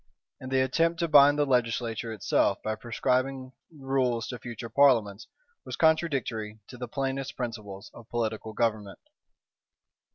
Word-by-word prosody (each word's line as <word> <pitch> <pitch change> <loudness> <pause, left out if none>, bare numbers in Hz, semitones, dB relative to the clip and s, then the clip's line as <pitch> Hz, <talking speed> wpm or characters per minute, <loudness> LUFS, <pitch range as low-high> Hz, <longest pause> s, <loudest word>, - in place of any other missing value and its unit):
And 130 0 -8
the 130 0 +3
attempt 165 +6 +1
to 170 - +1
bind 145 -1 +6
the 145 - +2
legislature 115 -3 -1
itself, 105 -5 +1
by 110 - -1
prescribing 130 +3 -1 0.2
rules 135 -5 -1
to 125 - -6
future 120 -1 -7
parliaments, 115 -5 +3 0.4
was - - -6
contradictory 135 -10 0
to 125 - -10
the 125 - -5
plainest 135 +1 -3
principles 110 -4 -6
of 120 -1 -14
political 110 -2 -3
government. 110 -3 -1
125 Hz, 135 wpm, -28 LUFS, 110-135 Hz, 0.4 s, bind